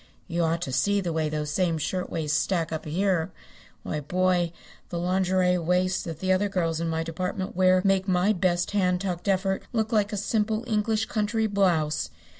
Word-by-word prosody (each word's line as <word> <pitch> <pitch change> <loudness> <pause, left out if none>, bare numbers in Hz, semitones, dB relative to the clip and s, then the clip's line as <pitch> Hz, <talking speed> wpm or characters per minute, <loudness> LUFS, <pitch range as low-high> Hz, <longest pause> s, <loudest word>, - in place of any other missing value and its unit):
You 170 -1 -1
ought 165 +1 0
to 135 - -4
see 200 +11 +2
the 175 -4 -2
way 160 -1 0
those 150 -1 -3
same 170 0 +1
shirtwaist 160 -1 -2
stack 170 -5 0
up 160 - -4
here. 180 +1 0 0.5
Why, 150 - -3
boy, 180 +3 +1 0.4
the 175 - -4
lingerie 180 0 +2
waists 180 +2 +1
that 165 -2 -6
the 190 0 +1
other 200 +2 +1
girls 165 -4 -1
in 165 - -1
my 160 0 -1
department 180 +3 -4
wear 185 0 +4
make 195 0 +2
my 185 +3 +3
best 175 -2 0
hand 180 -3 +1
tucked 180 -2 -3
effort 190 0 +1
look 220 -1 0
like 210 -2 +2
a 210 - -2
simple 215 +2 0
English 220 -1 0
country 220 0 0
blouse. 175 -7 +1
185 Hz, 185 wpm, -26 LUFS, 165-195 Hz, 0.5 s, wear